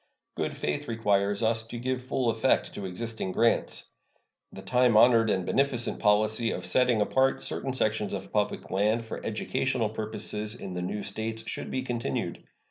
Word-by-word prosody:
Good - - -3
faith 75 0 -2
requires 105 -2 +1
us 110 0 +2
to 120 - -6
give 130 +1 -2
full 130 -2 0
effect 115 +4 +1
to 100 - -5
existing 110 0 -4
grants. 115 0 +2 0.6
The 95 - -10
time 125 +1 +3
honored 115 -1 +6
and 95 -3 0
beneficent 130 -1 +1
policy 110 +2 +3
of - - -4
setting 125 -4 +3
apart 130 +5 +2
certain 135 - -2
sections 110 -5 0
of 95 0 -8
public 105 -1 -1
land 105 +4 +1
for 115 - -7
educational 115 +1 -1
purposes 110 0 -4
in 95 -6 -7
the 90 - -3
new 100 +3 -3
States 110 0 -3
should - - -5
be 130 - -2
continued. 120 -2 -3
110 Hz, 165 wpm, -28 LUFS, 105-120 Hz, 0.6 s, honored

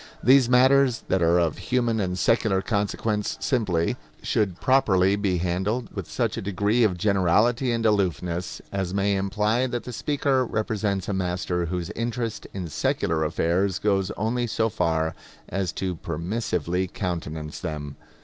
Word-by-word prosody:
These 130 0 +6
matters 130 -1 +4
that 95 - +2
are 85 +1 +4
of 85 -3 +1
human 120 -3 0
and 90 -2 -1
secular 95 -2 +2
consequence 105 0 -1
simply, 95 -11 0 0.3
should 95 -5 0
properly 100 -8 +3
be 100 -3 0
handled 95 +8 -1
with - - -5
such - - -1
a - - -3
degree 105 +4 +1
of 95 -5 +2
generality 105 +6 +2
and 115 -1 -1
aloofness 90 -4 0
as 95 -1 -2
may 100 0 +2
imply 105 +5 +1
that 120 -2 -3
the 125 - -7
speaker 140 0 +1
represents 105 -4 -1
a 105 - -1
master 90 -2 -1
whose 90 0 -3
interest 115 -1 -3
in 95 -3 -5
secular 80 +1 0
affairs 85 +4 +1
goes 95 -3 +1
only 120 +4 0
so 110 0 0
far 80 -6 0 0.3
as 95 -2 -2
to 90 -3 -3
permissively 90 +1 -2
countenance 80 -4 -4
them. 75 -4 -5
100 Hz, 150 wpm, -25 LUFS, 90-115 Hz, 0.3 s, These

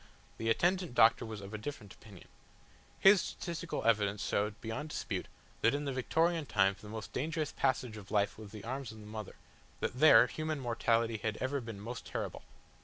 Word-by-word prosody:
The 115 - -1
attendant 175 +3 +1
doctor 115 0 +5
was 110 -2 -6
of 100 +2 -9
a 110 - -4
different 105 -4 -7
opinion. 100 -5 -15 0.7
His 195 -1 +7
statistical 170 -1 -4
evidence 105 -3 +2
showed 105 0 -1
beyond 120 +7 -5
dispute - - -3 0.3
that 115 +4 +4
in 145 +1 -2
the 140 - -2
Victorian 160 +5 +1
times 95 -2 +2
the 105 - -10
most 110 -1 -7
dangerous 155 +2 -1
passage 125 -4 0
of 100 -2 -11
life 105 -1 +1
was 105 -2 -10
the 105 -2 -9
arms 130 0 -4
of 110 - -11
the 105 - -11
mother, 105 -1 -7 0.4
that 125 - -3
there 130 -6 +8
human 155 +3 -3
mortality 115 -2 +1
had 110 0 -2
ever 135 +1 -1
been 115 -4 -7
most 115 +3 -6
terrible. - - -4
115 Hz, 185 wpm, -33 LUFS, 105-145 Hz, 0.7 s, there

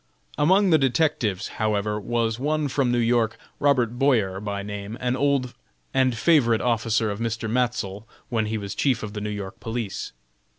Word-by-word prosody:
Among 185 +6 +4
the 160 - +6
detectives, 125 - +1
however 105 -1 0
was 115 +1 -1
one 150 +1 0
from 130 -2 +1
New 120 - +2
York, 115 -1 +2 0.2
Robert 125 -5 +2
Boyer, 110 -9 +2
by 100 -1 -4
name, 105 +2 -6
an 125 0 0
old 140 -2 +1 0.4
and 130 -3 +2
favorite 120 -5 +4
officer 115 -2 +1
of 100 - -5
Mr. 115 -1 -2
Matsell 115 -4 -1 0.2
when 110 -3 0
he 110 +1 -2
was 100 -2 -5
chief 130 -6 +1
of 105 -1 -5
the 105 - -4
New 105 - -3
York 100 -2 -6
police. 115 -4 -4
115 Hz, 170 wpm, -24 LUFS, 105-130 Hz, 0.4 s, the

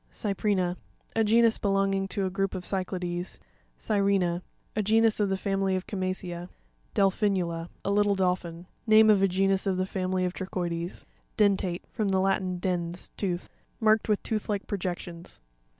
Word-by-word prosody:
Cypri'na.— 195 -3 0 0.4
A 225 - +3
genus 230 +1 +4
belonging 195 -1 +1
to 195 0 -1
a 185 - -2
group 195 +1 -1
of 180 -1 -5
Cy'clades. 180 -2 -3 0.4
Cyre'na.—A 195 -1 -1
genus 220 +2 +3
of 205 -2 +2
the 190 - 0
family 195 -1 0
of 185 - -3
Chama'cea. 185 -2 -4 0.5
Devrui'nuta.—Latin. 185 -4 +1 0.2
A 200 - +1
little 205 0 +3
dol 185 -1 +3
phin. 170 -1 -10 0.2
Name 220 0 +7
of 200 -2 +4
a 195 - +5
genus 195 +1 +1
of 190 -1 +1
the 185 - +1
family 185 -1 -1
of 180 - -2
Trochoides. 175 -2 -4 0.3
Den'rateE.— 195 -4 +2
From 215 -4 -2
the 190 -1 +2
Latin, 190 -1 +1
dens, 175 -1 -3
tooth. 180 -3 -2 0.3
Marked 220 0 +3
with 210 - +1
tooth 220 -2 -2
like 205 -1 -1
projections. 175 -3 -5
190 Hz, 155 wpm, -28 LUFS, 180-200 Hz, 0.5 s, Name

